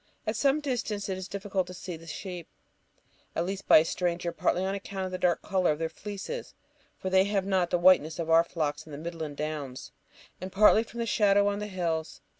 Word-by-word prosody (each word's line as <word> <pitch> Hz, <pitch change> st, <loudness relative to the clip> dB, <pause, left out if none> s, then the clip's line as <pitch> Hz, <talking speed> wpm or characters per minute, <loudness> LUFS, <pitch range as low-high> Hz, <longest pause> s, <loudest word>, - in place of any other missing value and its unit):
At 215 Hz, +1 st, -1 dB
some 280 Hz, +5 st, +2 dB
distance 225 Hz, -8 st, -2 dB
it 190 Hz, -, -2 dB
is 190 Hz, -, -6 dB
difficult 195 Hz, -1 st, -2 dB
to 180 Hz, -, -8 dB
see 180 Hz, -1 st, -6 dB
the 165 Hz, +1 st, -13 dB
sheep, 175 Hz, +1 st, -6 dB, 0.9 s
at 165 Hz, -, 0 dB
least 195 Hz, +1 st, -5 dB
by -, -, +9 dB
a 155 Hz, -, +5 dB
stranger, 175 Hz, 0 st, -1 dB
partly 180 Hz, +2 st, 0 dB
on 195 Hz, -, -1 dB
account 195 Hz, -1 st, -4 dB
of 185 Hz, -, -5 dB
the 185 Hz, -, -4 dB
dark 175 Hz, -2 st, +1 dB
colour 190 Hz, -3 st, +1 dB
of 150 Hz, -, -1 dB
their 165 Hz, +1 st, -2 dB
fleeces 205 Hz, -, -7 dB, 0.4 s
(for 185 Hz, -, -4 dB
they 190 Hz, 0 st, +5 dB
have 200 Hz, -2 st, 0 dB
not 190 Hz, -3 st, +1 dB
the 175 Hz, -, +2 dB
whiteness 175 Hz, -3 st, +5 dB
of 165 Hz, -2 st, -3 dB
our 165 Hz, 0 st, +6 dB
flocks 155 Hz, -3 st, -3 dB
in -, -, -11 dB
the 140 Hz, -, -6 dB
midland 160 Hz, -2 st, -6 dB
downs), 150 Hz, -4 st, -5 dB, 0.5 s
and 185 Hz, +1 st, -5 dB
partly 210 Hz, +3 st, +6 dB
from 235 Hz, +1 st, -6 dB
the -, -, 0 dB
shadow 205 Hz, -2 st, +3 dB
on 205 Hz, 0 st, 0 dB
the 210 Hz, -, -4 dB
hills. 170 Hz, -5 st, -2 dB
185 Hz, 225 wpm, -28 LUFS, 165-200 Hz, 0.9 s, by